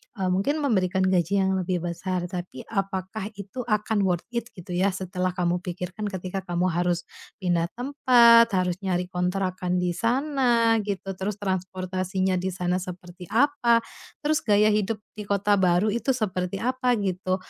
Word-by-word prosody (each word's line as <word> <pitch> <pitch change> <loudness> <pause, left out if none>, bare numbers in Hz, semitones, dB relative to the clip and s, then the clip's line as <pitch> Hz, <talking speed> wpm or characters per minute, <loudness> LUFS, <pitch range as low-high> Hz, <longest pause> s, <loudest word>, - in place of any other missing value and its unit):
eee, 190 -3 -1
mungkin 285 +12 0
memberikan 190 -7 +1
gaji 185 0 +2
yang 190 - +1
lebih 180 -1 -2
besar 175 +1 -2
tapi 175 -8 -6
apakah 195 0 -3
itu 200 +5 -8
akan 210 -2 +1
worth 175 -2 0
it 235 -1 -2
gitu 180 -1 -10
ya 180 +2 +2
setelah 185 -1 -2
kamu 175 -1 0
pikirkan 180 +3 -5
ketika 190 -1 -4
kamu 175 +1 +1
harus 175 0 0 0.4
pindah 170 -2 +1
tempat, 240 -3 +6
harus 180 -1 0
nyari 180 -2 -2
kontrakan 180 0 -1
di 180 - +1
sana 235 - +2
gitu, 195 -1 -3
terus 200 +2 -2
transportasinya 185 -1 -2
di 185 - -2
sana 180 0 0
seperti 180 -1 -9
apa, 235 - +3 0.4
terus 305 +1 +2
gaya 210 -4 +3
hidup 210 +1 +1 0.2
di 210 -1 -6
kota 200 0 +2
baru 185 +3 +3
itu 245 +4 0
seperti 190 -4 -2
apa 255 0 +1
gitu. 185 -3 -1
190 Hz, 155 wpm, -25 LUFS, 180-215 Hz, 0.4 s, tempat